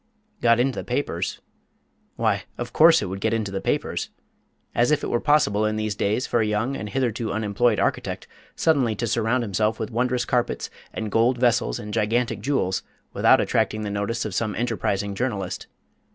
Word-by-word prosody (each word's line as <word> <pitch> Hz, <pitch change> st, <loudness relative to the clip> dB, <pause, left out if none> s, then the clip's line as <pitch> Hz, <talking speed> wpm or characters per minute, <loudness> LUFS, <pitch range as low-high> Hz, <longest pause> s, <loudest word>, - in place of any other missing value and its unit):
Got 115 Hz, 0 st, +4 dB
into 130 Hz, +1 st, +1 dB
the -, -, -5 dB
papers? 120 Hz, -9 st, -2 dB, 0.7 s
Why, -, -, 0 dB
of 120 Hz, 0 st, -5 dB
course 165 Hz, +1 st, +6 dB
it -, -, -2 dB
would 95 Hz, +1 st, -5 dB
get 110 Hz, +1 st, +1 dB
into 105 Hz, -3 st, -2 dB
the 95 Hz, -, -3 dB
papers. -, -, -1 dB, 0.6 s
As 120 Hz, +1 st, +3 dB
if 150 Hz, -, +2 dB
it -, -, -2 dB
were 120 Hz, -, +2 dB
possible 130 Hz, -9 st, +3 dB
in 110 Hz, 0 st, +1 dB
these 110 Hz, -1 st, -1 dB
days 105 Hz, +5 st, 0 dB
for 120 Hz, -, +1 dB
a -, -, +2 dB
young 110 Hz, +6 st, 0 dB
and 105 Hz, -, -5 dB
hitherto 120 Hz, -2 st, -1 dB
unemployed 110 Hz, +1 st, +1 dB
architect -, -, -1 dB, 0.3 s
suddenly 135 Hz, -9 st, +2 dB
to 120 Hz, -, -2 dB
surround 115 Hz, +2 st, +1 dB
himself 105 Hz, +1 st, 0 dB
with 110 Hz, 0 st, -3 dB
wondrous 125 Hz, +1 st, 0 dB
carpets, 120 Hz, -1 st, -1 dB, 0.2 s
and 110 Hz, -1 st, -4 dB
gold 120 Hz, +4 st, +3 dB
vessels, 120 Hz, -, +2 dB
and 105 Hz, 0 st, -7 dB
gigantic 115 Hz, +1 st, 0 dB
jewels 105 Hz, -7 st, 0 dB, 0.3 s
without -, -, +5 dB
attracting 110 Hz, 0 st, 0 dB
the 105 Hz, -, -3 dB
notice 105 Hz, +3 st, -2 dB
of 105 Hz, -, -4 dB
some 110 Hz, +2 st, -1 dB
enterprising 105 Hz, -4 st, -1 dB
journalist. 100 Hz, -5 st, -3 dB
115 Hz, 180 wpm, -24 LUFS, 105-120 Hz, 0.7 s, course